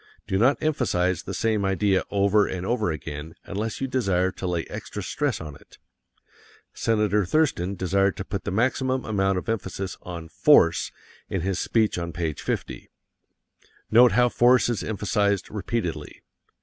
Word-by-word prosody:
Do 95 - -1
not 130 +6 +4
emphasize 95 - +1
the - - -6
same 110 -2 0
idea 95 0 +1
over 100 +1 +3
and 90 0 -4
over 120 -4 0
again 75 0 -7
unless 105 +3 -4
you 135 - -1
desire 95 -8 +1
to 95 - -5
lay 85 -2 -1
extra 105 - -7
stress 140 0 -1
on 80 -3 -7
it; - - -18 1.0
Senator 105 -2 +1
Thurston 100 - +1
desired 95 +1 +1
to 95 - -5
put 100 -1 -4
the - - -3
maximum 130 +5 0
amount 95 -3 +1
of 90 - -5
emphasis 95 -4 -3
on 85 -2 -7
"force" 80 -5 +4 0.4
in 95 - -2
his 95 +1 -1
speech 110 -5 +1
on 85 -1 -5
page 80 -4 -3
50. - - -4 1.0
Note 120 -1 +7
how 125 +2 +4
force 120 +1 +4
is 120 - -1
emphasized 100 -1 0
repeatedly. 95 -8 -4
100 Hz, 155 wpm, -25 LUFS, 90-115 Hz, 1.0 s, Note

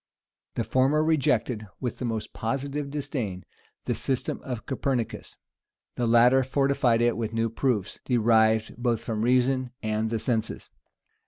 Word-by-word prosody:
The 115 - 0
former 130 +7 +2
rejected, 125 -8 +1
with 125 -3 -4
the 125 - -2
most 115 -2 -3
positive 140 +4 -3
disdain, 135 - -4 0.4
the - - 0
system 130 -2 -2
of 125 -4 -6
Copernicus: 130 -3 -3 0.6
the 120 - 0
latter 120 +3 +6
fortified 130 -3 +2
it 120 0 +3
with 115 -1 -3
new 115 0 0
proofs, 115 -5 -1
derived 110 -2 +3
both 120 -2 0
from 110 -2 -3
reason 130 +2 +2
and 110 0 0
the 115 - -1
senses. 110 -1 -2
120 Hz, 140 wpm, -26 LUFS, 110-130 Hz, 0.6 s, latter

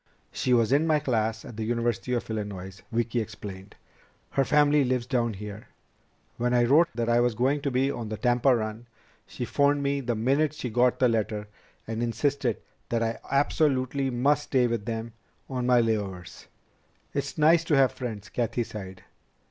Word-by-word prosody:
"She 125 - -1
was 115 -1 +3
in 145 +4 +3
my 155 -1 +4
class 110 -6 -1
at 110 - -10
the 110 - -2
University 115 -1 -1
of 120 - -1
Illinois," 100 -3 -5
Vicki 120 +1 0
explained. 100 -2 -9 0.6
"Her 135 - +2
family 145 +1 +4
lives 125 -2 0
down 120 -4 0
here. 105 +2 -8 0.7
When 125 +1 +1
I 120 - +4
wrote 150 +8 +5
that 115 -1 -1
I 120 0 +3
was 120 -2 +2
going 135 +5 +1
to 140 - -1
be 135 +1 +1
on 115 -5 -5
the 110 - -4
Tampa 125 +2 +3
run, 110 +1 -4 0.4
she 125 - -5
phoned 145 +2 +2
me 140 0 0
the 120 -2 -1
minute 140 +7 +1
she 125 -5 -5
got 125 +2 +3
the 130 - +4
letter 110 -2 -1 0.4
and 115 +1 -4
insisted 120 +1 0 0.3
that 115 -1 0
I 115 0 -2
absolutely 140 -1 +1
must 140 +4 +1
stay 130 -2 +2
with 115 -3 -2
them 115 0 -4 0.3
on 125 -2 -2
my 125 -1 +5
layovers." 100 -6 -2 0.7
"It's - - -3
nice 160 +2 +5
to 155 - +2
have 135 -2 +4
friends," 110 -6 -6
Cathy 120 0 -1
sighed. 95 -4 -9
120 Hz, 180 wpm, -27 LUFS, 110-135 Hz, 0.7 s, wrote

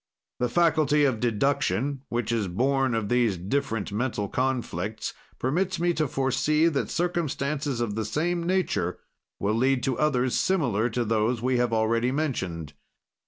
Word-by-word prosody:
"The 125 - +1
faculty 155 -1 +3
of 130 -5 +1
deduction, 130 +2 0
which 120 -1 -1
is 110 -4 0
born 130 +6 +1
of 110 -2 -1
these 120 -4 +2
different 110 +3 -2
mental 105 -1 -1
conflicts, 110 -5 -2 0.2
permits 175 +7 0
me 175 0 +2
to 155 -2 0
foresee 135 +4 +1
that 140 -4 -1
circumstances 150 -6 -1
of 115 -3 -1
the 110 +1 -2
same 170 +8 -1
nature 170 - 0 0.4
will 100 +2 0
lead 130 +3 +2
to 130 -2 -1
others 130 -5 +2
similar 125 - +1
to 120 +1 -1
those 110 +2 0
we 130 0 +2
have 120 -1 +1
already 115 +2 +1
mentioned. 95 - -2
125 Hz, 150 wpm, -26 LUFS, 110-145 Hz, 0.4 s, faculty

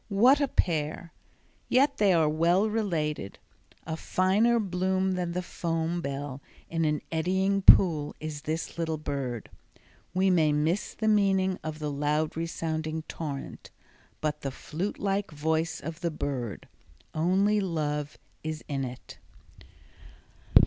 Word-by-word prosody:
What 245 +8 +5
a 285 - +3
pair! 160 - -1 0.6
yet 275 +2 +3
they 205 -2 +4
are 165 -3 +4
well 170 +6 +3
related. 160 - -2 0.5
A 160 - -3
finer 205 +8 +2
bloom 190 -1 0
than 180 -2 -2
the 180 +1 -2
foam 165 0 -2
bell 140 -2 -4 0.3
in 165 -1 +1
an 150 -1 0
eddying 190 +4 +1
pool 160 -6 +6
is 155 -2 -5
this 160 +2 -4
little 160 -1 -1
bird. 135 -6 -4 0.6
We 190 +1 +3
may 160 -4 +4
miss 160 +7 0
the 220 - -2
meaning 195 -3 +3
of 155 -1 -4
the 150 -1 -3
loud 150 +2 0
resounding 160 -1 -3
torrent, 150 -4 -6 0.5
but 155 -1 -1
the 135 - -2
flute 160 +8 -4
like 200 0 -1
voice 160 +2 -1
of 165 0 -6
the 170 - 0
bird—only 155 - -2
love 150 -5 -2 0.3
is 155 0 -4
in 140 -2 -2
it. 125 0 -8
165 Hz, 130 wpm, -28 LUFS, 150-190 Hz, 0.6 s, pool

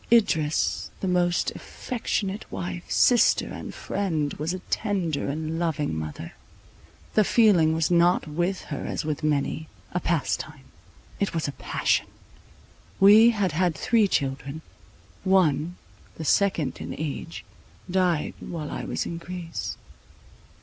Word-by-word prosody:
Idris, 160 -10 +2
the 190 - -2
most 175 -1 +2
affectionate 210 -5 -4
wife, 90 -2 -5
sister 245 -2 +4
and - - -7
friend, 160 -8 -2
was 155 +3 -3
a 185 - -3
tender 185 -10 -1
and 155 +3 -3
loving 160 - -1
mother. 80 -1 -5 0.8
The 215 - +5
feeling 190 -8 +4
was 160 0 +1
not 175 +1 +4
with 175 +5 -1
her - - -4
as - - -3
with 155 -2 -2
many, 150 +1 0 0.2
a - - 0
pastime; - - -2 0.6
it 200 -4 -1
was 160 - 0
a - - -2
passion. - - 0 0.9
We 210 +4 +8
had 205 -6 +1
had 170 +1 +1
three 220 +7 +3
children; 140 0 -2 0.6
one, 175 -3 +2 0.4
the 160 - -6
second 170 -5 +1
in - - -5
age, 155 +2 -5 0.4
died 180 -4 +1
while 155 -4 -6
I - - -4
was - - -2
in 170 - -5
Greece. 170 -1 -5
170 Hz, 130 wpm, -26 LUFS, 150-190 Hz, 0.9 s, We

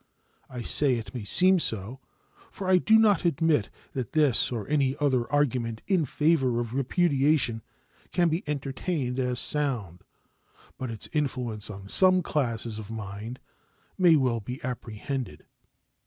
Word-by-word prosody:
I 125 -2 -7
say 140 0 +3
it 110 -4 -7
may 120 - -5
seem 185 - +5
so, 110 - 0 0.5
for 190 - -7
I 185 -1 +5
do 220 +4 +4
not 215 -3 +3
admit 160 - +1 0.2
that 130 -3 -5
this 150 -7 +3
or 115 -4 -4
any 140 -3 +1
other 130 -5 0
argument 125 -6 0
in 185 -6 +1
favor 135 -4 +1
of 120 -1 -4
repudiation 140 -3 +1 0.5
can 175 -1 +2
be 165 +3 -1
entertained 135 -1 -3
as 125 -1 -1
sound; 120 - -1 0.8
but 130 - -4
its 115 -2 -4
influence 125 -8 -2
on 100 -1 -9
some 185 - +4
classes 115 -6 -2
of 105 -1 -9
minds 110 +2 -7 0.6
may 175 -3 +5
well 130 -5 +1
be 125 +5 -7
apprehended. 120 - -5
130 Hz, 140 wpm, -26 LUFS, 115-150 Hz, 0.8 s, seem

